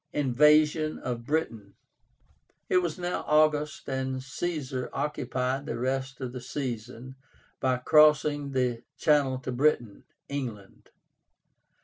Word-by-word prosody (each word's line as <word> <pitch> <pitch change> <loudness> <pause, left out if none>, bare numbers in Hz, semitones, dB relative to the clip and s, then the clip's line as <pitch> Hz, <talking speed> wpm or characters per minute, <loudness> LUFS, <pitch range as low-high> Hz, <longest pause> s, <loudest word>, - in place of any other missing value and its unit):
INVASION 150 +3 +3
OF 120 -1 -4
BRITAIN. 115 -10 -2 0.9
It - - +4
was 175 -3 0
now 180 0 -3
August 150 0 +2
and 130 -1 -3
Caesar 135 -3 -4
occupied 130 -1 -2
the - - -3
rest 130 +2 -2
of 125 -2 -4
the 125 - -6
season 125 -1 -5 0.5
by 130 -1 +1
crossing 150 0 +4
the 125 -3 0 0.2
Channel 145 -4 +3
to 130 - -4
Britain 120 -5 0 0.2
(England). 120 -8 -6
135 Hz, 110 wpm, -28 LUFS, 125-150 Hz, 0.9 s, It